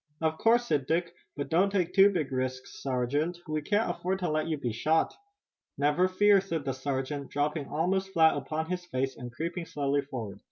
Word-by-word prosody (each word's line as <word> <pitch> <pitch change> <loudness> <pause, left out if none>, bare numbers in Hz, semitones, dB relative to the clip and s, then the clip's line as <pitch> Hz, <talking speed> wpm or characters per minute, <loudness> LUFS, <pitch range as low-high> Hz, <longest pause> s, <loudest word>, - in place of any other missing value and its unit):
"Of 160 -1 0
course," 235 +2 +4
said 145 - 0
Dick, 170 +1 0 0.2
"but 145 - -3
don't 185 +5 +4
take 180 -3 0
too 195 0 +7
big 165 -9 -2
risks, 130 0 -4
sergeant. 140 +6 -1
We 155 0 -1
can't 210 +8 +1
afford 180 +2 -1
to 175 -4 -1
let 155 +1 0
you 160 -2 -1
be 125 -4 -2
shot." 155 +9 +1 0.6
"Never 150 +6 +3
fear," 200 +1 +4
said 165 -7 -4
the 135 - -1
sergeant, 135 +1 -3
dropping 145 0 -1
almost 190 +5 0
flat 160 -3 +5
upon 155 +3 -3
his 180 -1 -2
face, 135 -5 -2
and 120 0 -8
creeping 170 +6 -4
slowly 140 0 0
forward. 120 -8 -6
155 Hz, 195 wpm, -29 LUFS, 140-180 Hz, 0.6 s, too